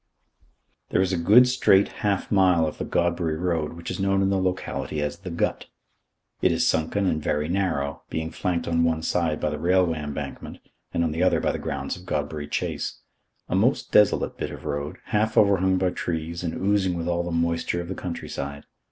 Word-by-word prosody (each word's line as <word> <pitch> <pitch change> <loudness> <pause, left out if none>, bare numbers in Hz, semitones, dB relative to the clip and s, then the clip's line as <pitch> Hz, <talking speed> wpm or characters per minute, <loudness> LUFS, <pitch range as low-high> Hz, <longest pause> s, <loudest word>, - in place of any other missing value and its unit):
There - - +1
is 95 0 -1
a - - +2
good 105 +9 +6
straight 100 -6 +4
half 100 -2 0
mile 90 -5 +4
of 75 - -5
the - - -2
Godbury 85 -2 0
Road 85 -3 -1
which 85 0 -7
is - - -5
known 95 0 +2
in 95 - +2
the 95 -1 +1
locality 90 -4 -2
as 75 0 -2
"The 95 -1 -7
Gut." 85 - -2 0.7
It - - +4
is - - +2
sunken 80 +5 +1
and 80 -4 0
very 75 0 0
narrow, 85 -7 -1
being 80 0 -3
flanked 90 -3 -2
on 85 0 +2
one 80 -1 +1
side 80 -2 0
by 75 - -1
the 75 - -4
railway 85 -1 +2
embankment, 75 -1 -6 0.3
and 85 - 0
on 80 - 0
the 80 - -2
other - - +3
by - - +1
the - - -4
grounds - - -3
of 90 - -14
Godbury 75 0 -3
Chase. - - -3 0.5
A - - -4
most 110 +9 +1
desolate 105 -2 +3
bit - - -3
of - - -9
road, 75 +4 -3 0.2
half 110 +1 +1
overhung 95 -2 +4
by 90 -1 +1
trees 85 0 -4
and 85 - -2
oozing 95 -2 +1
with 85 0 -3
all 85 0 +1
the 85 - -4
moisture 85 +1 0
of 85 - -5
the 95 - -3
country 90 -3 -5
side. 70 +1 -6
85 Hz, 205 wpm, -25 LUFS, 80-95 Hz, 0.7 s, good